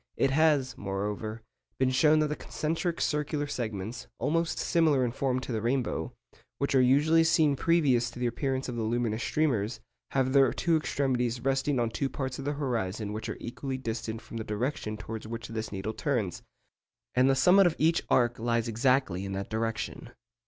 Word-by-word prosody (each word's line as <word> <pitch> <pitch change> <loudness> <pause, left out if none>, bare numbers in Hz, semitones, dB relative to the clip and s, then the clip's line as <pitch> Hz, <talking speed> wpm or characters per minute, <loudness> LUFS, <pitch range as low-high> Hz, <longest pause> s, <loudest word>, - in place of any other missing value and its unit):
It 135 - +2
has, 145 -3 +3
moreover, 105 +3 -4 0.3
been 130 -1 +2
shown 150 +4 +4
that 150 - +1
the 150 - -1
concentric 165 +3 -2
circular 150 0 0
segments, 115 -3 -4
almost 165 +2 0
similar 155 -6 +2
in 120 - -1
form 130 0 0
to 130 - -6
the 110 -2 -1
rainbow, 125 +1 -1 0.5
which 140 - -1
are 130 - +5
usually 150 +6 +4
seen 160 -3 +3
previous 140 -6 +2
to - - -13
the 125 - -1
appearance 130 +2 -1
of 125 - -4
the 115 - -2
luminous 115 0 -1
streamers, 125 -9 0 0.3
have 130 -1 +1
their 135 -3 +5
two 170 -1 +1
extremities 125 -6 0
resting 135 +1 +1
on 115 -1 0
two 135 +3 -1
parts 130 -2 -4
of 135 - -6
the 145 - 0
horizon 110 -7 -2
which 110 +1 -5
are - - -4
equally 130 +2 -5
distant 115 -2 -4
from 115 - -8
the 110 - -3
direction 110 0 -3
towards 110 0 -7
which 115 +1 -6
the 110 -1 -4
needle 100 +2 -4
turns; 115 - -2 0.7
and 130 +2 +4
the 135 - +4
summit 180 +8 +6
of 165 - 0
each 165 +2 +3
arc 120 -1 +3
lies 115 0 0
exactly 115 -4 +1
in 100 0 -4
that 100 +2 -4
direction. 115 +1 -3
125 Hz, 185 wpm, -29 LUFS, 115-140 Hz, 0.7 s, summit